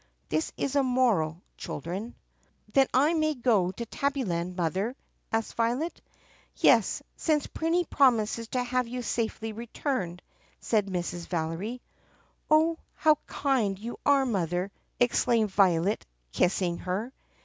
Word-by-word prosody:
(This 155 Hz, +1 st, 0 dB
is 280 Hz, 0 st, -2 dB
a 280 Hz, -, +5 dB
moral, 225 Hz, -, +1 dB
Children.) 185 Hz, -, -5 dB, 0.6 s
"Then 270 Hz, -1 st, +5 dB
I 290 Hz, +6 st, +4 dB
may 310 Hz, -2 st, +1 dB
go 225 Hz, -8 st, +2 dB
to 235 Hz, +5 st, -5 dB
Tabbyland, 205 Hz, -11 st, -2 dB
Mother*?" 190 Hz, +7 st, -1 dB, 0.4 s
asked 225 Hz, 0 st, -1 dB
Violet. 245 Hz, +9 st, -1 dB, 0.5 s
"Yes, -, -, +4 dB
since 305 Hz, -3 st, +1 dB
Prinny 335 Hz, +2 st, 0 dB
promises 230 Hz, -4 st, +2 dB
to 250 Hz, +2 st, -1 dB
have 250 Hz, 0 st, 0 dB
you 250 Hz, +1 st, -4 dB
safely 225 Hz, -1 st, -2 dB
returned," 225 Hz, -, -3 dB, 0.4 s
said 210 Hz, -3 st, +1 dB
Mrs. 175 Hz, -2 st, -3 dB
Valery. 175 Hz, +9 st, -3 dB, 0.7 s
"Oh, 320 Hz, +2 st, +4 dB, 0.2 s
how 310 Hz, -2 st, +4 dB
kind 245 Hz, -9 st, 0 dB
you 230 Hz, +4 st, -7 dB
are, 280 Hz, -1 st, +4 dB
mother!" 180 Hz, -4 st, -1 dB, 0.3 s
exclaimed 235 Hz, -3 st, +2 dB
Violet 190 Hz, 0 st, +2 dB, 0.2 s
kissing 175 Hz, -, +1 dB
her. 205 Hz, +8 st, -3 dB
230 Hz, 125 wpm, -28 LUFS, 185-265 Hz, 0.7 s, a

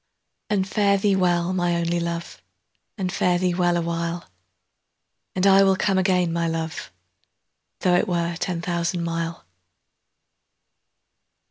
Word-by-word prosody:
And 195 Hz, -2 st, +1 dB
fare 200 Hz, 0 st, +2 dB
thee 195 Hz, 0 st, +2 dB
weel, 175 Hz, -1 st, +1 dB
my 175 Hz, -2 st, +1 dB
only 170 Hz, 0 st, 0 dB
Luve, 170 Hz, 0 st, -4 dB, 0.6 s
And 185 Hz, -3 st, -2 dB
fare 180 Hz, 0 st, +1 dB
thee 180 Hz, 0 st, 0 dB
weel 175 Hz, -1 st, +2 dB
a 170 Hz, -, -1 dB
while! 170 Hz, +1 st, -3 dB, 1.1 s
And 185 Hz, +1 st, +1 dB
I 195 Hz, 0 st, +7 dB
will 195 Hz, -1 st, +4 dB
come 190 Hz, 0 st, +1 dB
again, 180 Hz, -3 st, +1 dB
my 170 Hz, 0 st, 0 dB
Luve, 160 Hz, 0 st, -2 dB
15 90 Hz, -, -9 dB, 0.9 s
Tho' 180 Hz, -, +3 dB
it -, -, +1 dB
were 170 Hz, -1 st, -1 dB
ten 175 Hz, -3 st, -2 dB
thousand 170 Hz, 0 st, -1 dB
mile. 165 Hz, -, -4 dB
175 Hz, 140 wpm, -23 LUFS, 170-185 Hz, 1.1 s, I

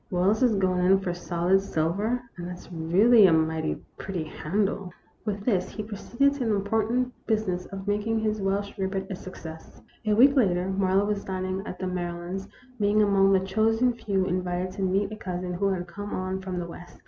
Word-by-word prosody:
Wells 190 Hz, +6 st, +2 dB
is 245 Hz, -4 st, +4 dB
going 185 Hz, -2 st, +2 dB
in 195 Hz, +1 st, +5 dB
for 185 Hz, -2 st, -2 dB
solid 175 Hz, +2 st, +1 dB
silver, 200 Hz, +7 st, -1 dB
and 175 Hz, -1 st, -6 dB
that's 180 Hz, 0 st, -8 dB
really 190 Hz, +7 st, +5 dB
a -, -, +4 dB
mighty 160 Hz, 0 st, +1 dB, 0.2 s
pretty 185 Hz, -4 st, -3 dB
handle." 190 Hz, +4 st, -2 dB, 0.3 s
With 205 Hz, -1 st, -3 dB
this 190 Hz, -7 st, +1 dB
he 215 Hz, -, -5 dB
proceeded 235 Hz, +6 st, 0 dB
to 285 Hz, -, -8 dB
the 220 Hz, -2 st, +2 dB
important 225 Hz, +5 st, 0 dB
business 205 Hz, -5 st, 0 dB
of 195 Hz, 0 st, -8 dB
making 210 Hz, +2 st, 0 dB
his 215 Hz, -1 st, -1 dB
Welsh 200 Hz, +1 st, -1 dB
rarebit 190 Hz, 0 st, -2 dB
a -, -, -2 dB
success. 165 Hz, -3 st, -10 dB, 0.3 s
A 210 Hz, -, +4 dB
week 270 Hz, +5 st, +6 dB
later 185 Hz, -7 st, +2 dB
Marlowe 190 Hz, +1 st, +2 dB
was 205 Hz, -1 st, -1 dB
dining 185 Hz, 0 st, -3 dB
at 180 Hz, -, -6 dB
the 185 Hz, -, -4 dB
Mary 180 Hz, -1 st, -2 dB
lands', 190 Hz, +3 st, -5 dB, 0.3 s
being 210 Hz, +1 st, +3 dB
among 195 Hz, -1 st, +4 dB
the 190 Hz, -1 st, +4 dB
chosen 225 Hz, +5 st, +2 dB
few 200 Hz, -5 st, -1 dB
invited 180 Hz, 0 st, -1 dB
to 195 Hz, -, -6 dB
meet 195 Hz, +2 st, +1 dB
a -, -, -4 dB
cousin 180 Hz, -3 st, -4 dB
who 195 Hz, +3 st, 0 dB
had 185 Hz, -2 st, -1 dB
come 205 Hz, +3 st, -6 dB
on 185 Hz, +1 st, -3 dB
from 185 Hz, -1 st, -4 dB
the 175 Hz, -, -2 dB
West. 175 Hz, +1 st, -11 dB
195 Hz, 195 wpm, -26 LUFS, 180-210 Hz, 0.3 s, week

